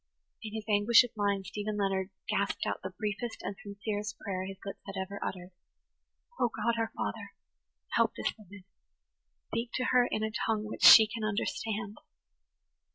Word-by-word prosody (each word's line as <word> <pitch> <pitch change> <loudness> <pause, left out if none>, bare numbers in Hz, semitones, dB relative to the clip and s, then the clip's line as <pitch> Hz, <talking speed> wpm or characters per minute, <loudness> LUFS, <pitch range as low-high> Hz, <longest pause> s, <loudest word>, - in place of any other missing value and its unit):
In 220 -1 -7
his 220 -1 -5
anguish 215 +3 +6
of 245 - -7
mind 200 -2 0
Stephen 210 +2 -4
Leonard 195 -1 0 0.2
gasped - - 0
out - - -2
the - - -4
briefest 215 +2 -4
and 200 - -4
sincerest 205 +1 -4
prayer 185 -2 -4
his 195 0 -7
lips 195 - -6
had 195 -1 -5
ever 200 +1 -5
uttered. 180 0 -5 0.9
"O, 240 - +3
God, 230 +1 0
our 225 0 -1
Father! 100 - -4 0.6
Help - - +2
this - - -1
woman. 205 -2 -14 0.9
Speak 230 +1 -2
to 255 - 0
her 250 -1 +5
in 215 - -1
a 220 - -1
tongue 220 -1 -1
which 215 - -6
she 220 - +11
can 220 +1 -6
understand." 215 0 -2
210 Hz, 165 wpm, -31 LUFS, 200-220 Hz, 0.9 s, she